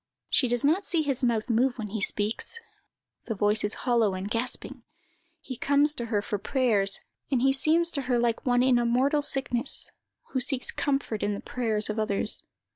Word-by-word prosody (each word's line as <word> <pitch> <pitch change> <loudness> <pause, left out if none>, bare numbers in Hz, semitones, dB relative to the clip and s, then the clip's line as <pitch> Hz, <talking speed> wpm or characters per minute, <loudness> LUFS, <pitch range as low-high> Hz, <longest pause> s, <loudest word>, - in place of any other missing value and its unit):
She 255 - +3
does 240 0 0
not 325 +8 +3
see 335 -4 0
his 275 -3 0
mouth 230 -2 +1
move 245 +2 +1
when 215 -3 -5
he 215 0 -4
speaks. 210 - 0 0.7
The 225 - -2
voice 210 +2 +1
is 210 - +1
hollow 230 -6 +2
and 185 +1 -4
gasping. 250 +2 -2 0.6
He 265 -4 -7
comes 285 +3 +3
to 235 -5 -5
her 210 -3 0
for 205 - -3
prayers, 210 -5 +1 0.3
and 255 -3 +1
he 270 0 +4
seems 325 +5 +2
to 280 - -1
her 245 - +3
like 235 -1 0
one 245 -1 +2
in 255 -2 +4
a 240 - 0
mortal 270 +5 +2
sickness, 270 -2 0 0.4
who 260 - 0
seeks 255 +1 -1
comfort 275 -6 -2
in 205 0 0
the - - -6
prayers 220 -4 0
of 215 +1 -3
others. 215 -1 -1
245 Hz, 195 wpm, -27 LUFS, 215-270 Hz, 0.7 s, he